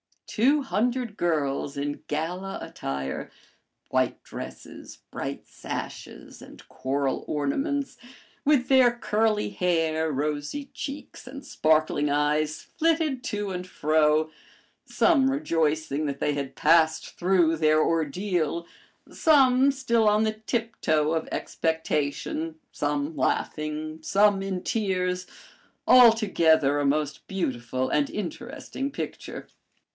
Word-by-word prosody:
Two 275 +7 +2
hundred 245 -2 -1
girls 145 -4 -1
in 145 +1 -3
gala 180 +6 -3
attire, 70 0 -5 0.6
white - - 0
dresses, - - -9
bright - - -5
sashes, - - -8
and - - -14
coral 135 +1 -2
ornaments, 275 - -1 0.5
with 280 -4 +3
their 260 -3 +6
curly 215 -2 0
hair, 165 -4 0
rosy 150 - -3
cheeks, 280 -2 -7
and 275 +1 -9
sparkling 155 - +2
eyes, 150 +1 +1
flitted 315 -5 0
to 205 -1 -3
and 180 0 -5
fro, 155 -1 +2 0.5
some 280 -6 +3
rejoicing 160 - 0
that 140 -1 -4
they 150 - +1
had 140 -2 -4
passed 160 -1 +2
through 175 -3 +3
their 155 0 +3
ordeal, 165 +1 -1 0.5
some 270 -4 +4
still 235 -5 +1
on 210 +1 +4
the 215 0 +1
tiptoe 215 - -1
of 160 -1 -1
expectation, 160 0 -2 0.2
some 145 +1 -2
laughing, 155 +3 -2
some 200 +3 +3
in 190 -2 -3
tears 185 -4 -1 0.6
altogether 180 - +5
a 145 - 0
most 150 +1 -1
beautiful 130 -8 -2
and 145 -1 +1
interesting 235 +6 -5
picture. 285 - -6
165 Hz, 110 wpm, -26 LUFS, 150-225 Hz, 0.6 s, their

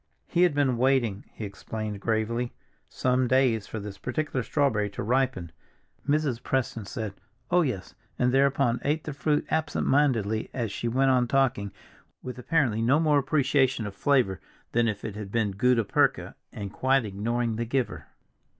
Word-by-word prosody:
He 175 - 0
had 175 -5 +4
been 135 -4 +2
waiting, 120 -6 +1
he 110 - -6
explained 105 +1 -6
gravely, 115 +2 -1 0.4
some 125 0 +1
days 125 -4 +2
for 110 - -5
this 100 -1 -8
particular 130 +2 -2
strawberry 115 -6 +1
to 100 - -5
ripen. 125 -7 0 0.6
Mrs. 145 -5 +1
Preston 120 -5 -2
said, 110 -3 -5 0.4
"Oh, 180 0 +5
yes," 125 - -3 0.2
and 125 0 +2
thereupon 135 -3 +2
ate 150 +2 0
the 150 - -5
fruit 150 +1 0
absent 160 -2 0
mindedly 115 -7 +2
as 115 -5 -2
she 120 - -3
went 130 +3 +3
on 125 -1 +3
talking, 120 -7 +1 0.5
with 125 -1 -6
apparently 125 -5 +1
no 130 +6 +4
more 150 -3 +4
appreciation 135 -3 +1
of 100 - -5
flavor 110 - +1 0.3
than 120 0 +2
if 105 -2 -3
it 105 - -5
had 105 -2 -7
been 110 -3 +1
gutta 115 +4 +2
percha, 100 - +1 0.2
and 100 -2 -7
quite 130 -1 +2
ignoring 115 +3 -1
the 115 - -1
giver. 125 +1 -2
125 Hz, 165 wpm, -27 LUFS, 110-135 Hz, 0.6 s, Oh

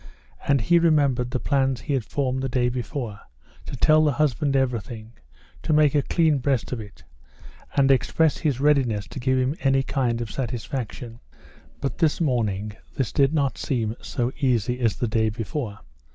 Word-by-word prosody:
And 140 -3 +3
he 170 +10 +4
remembered 140 -7 +2
the 125 0 -2
plans 135 -2 0
he 145 - -3
had 130 -4 0
formed 130 +1 -2
the 135 - -2
day 125 0 +1
before, 120 -3 -4 0.5
to - - -5
tell 155 0 +4
the 150 -2 +2
husband 145 0 +1
everything, 120 -3 -2 0.5
to 155 - 0
make 150 -2 +4
a 145 - +3
clean 155 0 +2
breast 130 -2 -1
of 125 - -3
it, 105 -3 -11 0.7
and 135 -1 +4
express 155 +3 +2
his 145 -6 0
readiness 135 -8 +2
to - - -7
give 130 +1 +1
him 130 +3 0
any 135 -1 +2
kind 125 -4 -1
of 115 -3 -5
satisfaction. 120 -1 -5 0.6
But 140 - -3
this 160 -4 +2
morning 110 - 0 0.2
this 135 -6 -1
did 140 -1 +3
not 140 -4 0
seem 115 -5 -1
so 120 0 -2
easy 125 -2 +1
as 115 -4 +1
the 120 - -1
day 110 0 +1
before. 110 0 -4
130 Hz, 175 wpm, -24 LUFS, 115-140 Hz, 0.7 s, he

